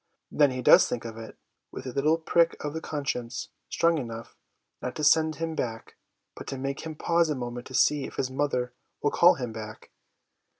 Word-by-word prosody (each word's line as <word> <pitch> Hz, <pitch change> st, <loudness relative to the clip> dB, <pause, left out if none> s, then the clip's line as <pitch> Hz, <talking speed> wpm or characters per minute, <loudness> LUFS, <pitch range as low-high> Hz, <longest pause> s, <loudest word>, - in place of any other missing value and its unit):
Then 145 Hz, -2 st, +4 dB
he 130 Hz, -1 st, -4 dB
does -, -, +7 dB
think 120 Hz, -1 st, -3 dB
of 115 Hz, -1 st, -6 dB
it, 115 Hz, -, -10 dB, 0.3 s
with -, -, -8 dB
a 130 Hz, -, -4 dB
little 150 Hz, +5 st, +2 dB
prick 165 Hz, +1 st, +2 dB
of 150 Hz, -1 st, -4 dB
con 145 Hz, -3 st, -4 dB
science, 120 Hz, -4 st, -3 dB, 0.2 s
strong 165 Hz, -1 st, +2 dB
enough, 115 Hz, -3 st, -7 dB, 0.5 s
not -, -, -4 dB
to 150 Hz, -, -4 dB
send 155 Hz, +1 st, +4 dB
him 165 Hz, 0 st, -3 dB
back, 115 Hz, -6 st, -4 dB, 0.4 s
but -, -, -10 dB
to 135 Hz, -, -4 dB
make 135 Hz, +1 st, -3 dB
him 160 Hz, -1 st, -6 dB
pause 170 Hz, +1 st, +2 dB
a 150 Hz, -, 0 dB
moment 120 Hz, -1 st, -5 dB
to 130 Hz, -, -7 dB
see 145 Hz, -2 st, +3 dB
if -, -, -9 dB
his 130 Hz, -, -2 dB
mother 130 Hz, -3 st, -1 dB, 0.3 s
will 145 Hz, -, +2 dB
call 175 Hz, +1 st, +6 dB
him 125 Hz, -4 st, -5 dB
back. 110 Hz, -1 st, -9 dB
135 Hz, 205 wpm, -27 LUFS, 120-155 Hz, 0.5 s, does